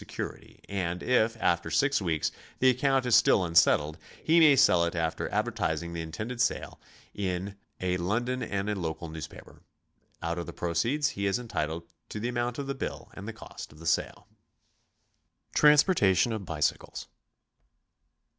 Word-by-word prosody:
security; - - -7
and 90 -3 -3
if, 115 -2 +2
after 85 -5 +1
six 140 +6 +2
weeks, 80 -4 0 0.3
the 130 0 +5
account 135 +1 +1
is 125 - +4
still 95 - +5
un 85 -2 -4
settled, 80 -1 +4 0.2
he 165 +2 +4
may 155 -4 +7
sell 90 -9 +5
it 85 +1 -1
after 80 -1 -2
advertising 85 0 -1
the 85 - -3
intended 105 +10 -5
sale 125 - -1 0.3
in 95 0 -3 0.2
a 90 0 0
London 120 +8 -1
and 100 -3 -2
a 105 - 0
local 85 -3 -4
newspaper. 80 -1 -10 0.6
Out 85 +1 -3
of 85 - -5
the - - -7
proceeds 115 - 0
he 100 -7 -2
is 100 - +1
entitled 85 -9 -3 0.3
to 105 - -5
the 120 +3 -2
amount 120 0 -2
of 140 - -3
the 140 - -2
bill 135 - -6
and - - -9
the - - -3
cost - - -10
of 75 - -16
the 80 - -12
sale. 85 - -1 1.3
TRANSPORTATION 145 - +4
OF 105 -3 -5
BICYCLES. 75 -3 -2
100 Hz, 165 wpm, -28 LUFS, 85-125 Hz, 1.3 s, may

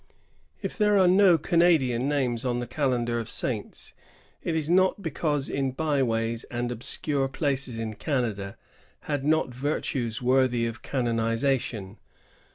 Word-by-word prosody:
^ - - -32 0.5
If - - -4
there 210 -1 +4
are 190 -2 +5
no 185 -1 +6
Canadian 150 -6 +2
names 130 -5 0
on 125 -2 0
the 120 - -3
calendar 120 -4 0
of 115 - -6
saints, - - -2 0.5
it 165 - -2
is 155 -2 0
not 185 +3 +3
because 150 -3 -1
in 135 -1 -1
byways 120 -6 0
and 120 0 -3
obscure 135 +4 -1
places 135 -4 -1 0.2
Canada 110 -9 -2 0.4
had 145 -3 -3
not 155 -3 +1
virtues 125 -3 -2
^rthy 125 -1 +2
of 115 - -7
canonization. 115 -3 -1
130 Hz, 135 wpm, -26 LUFS, 120-150 Hz, 0.5 s, no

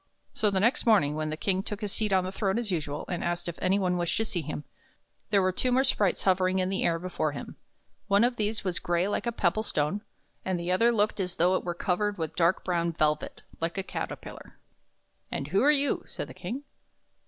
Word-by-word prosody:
So 215 - +2
the 195 -1 +1
next 235 +6 +2
morning 195 -10 +5
when 155 0 -2
the 155 - -3
King 190 +2 +1
took 210 +2 -6
his 205 -2 -3
seat 215 0 0
on 185 -1 +3
his 185 - -4
throne 195 0 0
as 235 -4 -2
usual, 150 -4 -2
and 175 - -3
asked 175 0 -2
if 170 - -5
any 190 +2 +3
one 180 -2 +1
wished 175 0 0
to 225 - +1
see 180 -5 -2
him, 150 0 -5 0.7
there 200 -2 +4
were 185 - +3
two 250 +7 0
more 260 +2 +4
sprites 210 -8 +1
hovering 185 0 +3
in 185 0 +1
the 195 - 0
air 165 - +2
before 165 -4 -2
him. - - -7 0.5
One 200 +2 +4
of 245 +1 +2
these 215 +1 -1
was 185 -2 -1
gray 175 +2 +1
like 205 - -1
a - - +2
pebble 210 -1 +1
stone, 185 -1 -1 0.4
and 185 -2 -1
the 170 +1 -2
other 230 +6 +4
looked 215 -2 +1
as 180 -2 -2
though 180 +2 +3
it - - 0
were 175 -1 -3
covered 200 +4 0
with 160 -2 -3
dark 170 +1 +2
brown 170 -2 0
velvet, 150 -1 0 0.2
like 165 +3 -2
a 195 - -1
caterpillar. - - -7 0.4
" - - -45
And 140 - -3
who 195 +5 +3
are 280 - +5
you? 285 -1 +3
" - - -26
said - - -5
the - - -10
King. 265 +5 -5
185 Hz, 240 wpm, -28 LUFS, 170-210 Hz, 0.7 s, morning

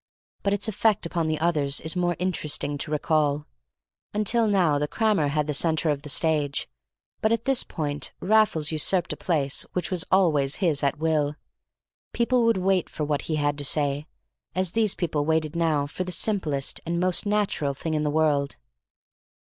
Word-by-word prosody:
But 200 - 0
its 205 +1 0
effect 215 -2 +1
upon 170 -1 -2
the 155 0 -1
others 150 -4 +1
is 160 +2 -1
more 175 -1 0
interesting 155 -5 0
to - - -4
recall. 150 -1 0 0.7
Until 220 +2 +2
now 175 -8 +2
the 150 - -1
crammer 210 -5 +1
had 150 +1 0
the 150 - -2
centre 160 +1 +1
of 140 -1 -3
the 150 - -8
stage, 145 -2 0 0.5
but 220 - +2
at 230 0 0
this 270 -2 +3
point 145 -3 -3
Raffles 195 -7 +2
usurped 165 +3 +1
a - - -6
place 145 -6 0
which 180 - -3
was 180 -3 +2
always 150 -8 +3
his 165 -8 +1
at 140 -1 0
will. 150 -2 0 0.8
People 240 0 +2
would 230 -3 +3
wait 185 -1 +1
for 155 - -5
what 145 -1 -1
he 155 - 0
had 145 -1 -1
to - - -1
say, 145 +1 +1 0.5
as 185 -2 0
these 220 -2 +1
people 155 -4 -1
waited 160 0 0
now 160 -4 +1
for 145 +6 -4
the 185 - -6
simplest 165 -9 0
and 170 +1 -2
most 185 +3 +2
natural 200 -9 0
thing 160 +3 -4
in 155 - 0
the 150 - 0
world. 145 -2 +1
160 Hz, 180 wpm, -25 LUFS, 145-185 Hz, 0.8 s, this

